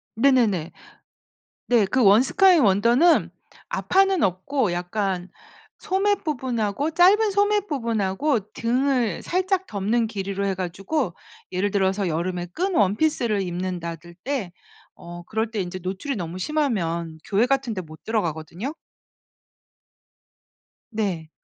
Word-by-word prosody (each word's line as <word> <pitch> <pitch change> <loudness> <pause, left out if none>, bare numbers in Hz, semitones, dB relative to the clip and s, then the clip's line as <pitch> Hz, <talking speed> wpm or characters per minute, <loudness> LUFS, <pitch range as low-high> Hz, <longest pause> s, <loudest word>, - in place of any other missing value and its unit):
네네네. 225 - +2 1.0
네. 235 -4 +4
그 255 +7 0
원 205 +4 +7
스카인 360 +2 +4
원더는 235 - +4 0.4
앞판는 385 -2 +2
없고 195 +4 0
약간 180 +1 -2 0.5
소매 410 0 +1
부분하고 260 - -2
짧은 400 +6 +5
소매 410 +1 +2
부분하고 230 - -1
등을 245 -3 0
살짝 375 +1 0
덮는 220 - 0
길이로 200 -2 -3
해 195 - 0
가지고 190 - -2 0.4
예를 190 +2 0
들어서 190 -1 +1
여름에 175 +2 -2
끈 365 - -2
원피스를 215 - +1
입는다들 175 -2 -5
때 250 -10 -2 0.5
어 175 0 -9
그럴 220 +4 -2
때 220 -2 -3
이제 185 0 -4
노출이 190 +10 -4
너무 175 -2 -5
심하면 175 - -1
교회 205 +3 +2
같은 265 -3 0
데 185 - -4
못 155 -1 -14
들어가거든요. 175 - -3 2.2
네. 190 -8 -2
210 Hz, 255 characters per minute, -24 LUFS, 185-275 Hz, 2.2 s, 원